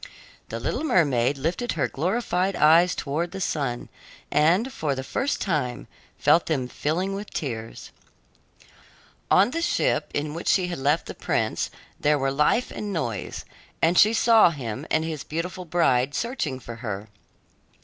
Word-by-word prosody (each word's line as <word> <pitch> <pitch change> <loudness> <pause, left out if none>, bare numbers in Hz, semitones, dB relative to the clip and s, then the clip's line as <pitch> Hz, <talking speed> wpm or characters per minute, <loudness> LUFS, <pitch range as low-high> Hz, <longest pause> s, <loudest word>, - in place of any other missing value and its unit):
The - - -4
little - - -2
mermaid 145 - +2
lifted 170 - -2
her 150 - 0
glorified 185 - -1
eyes 165 +4 +5
toward 155 +5 -2
the 195 - -5
sun 140 -9 -2 0.4
and, 180 - +3
for 145 - -1
the 130 - -4
first 270 - -1
time, 140 - -2 0.3
felt 150 +4 +3
them 135 -6 0
filling 175 +9 -2
with 200 +1 -6
tears. 115 -6 -5 1.4
On 200 +6 +5
the 330 +4 -2
ship 345 - +1
in 150 0 -2
which 170 - -6
she 180 -2 +3
had 175 - -4
left 145 +4 +1
the - - -7
prince - - -1 0.3
there 150 0 +3
were 135 -1 0
life 150 - +2
and 210 -1 -5
noise, 130 - -4 0.3
and 165 +2 +3
she 210 +4 +6
saw 225 -3 +5
him 135 -2 -5
and 160 - +1
his 160 -3 -4
beautiful 180 +3 -4
bride 145 -6 +2
searching 235 - -2
for 115 -2 -9
her. 105 -3 -5
160 Hz, 155 wpm, -25 LUFS, 135-185 Hz, 1.4 s, she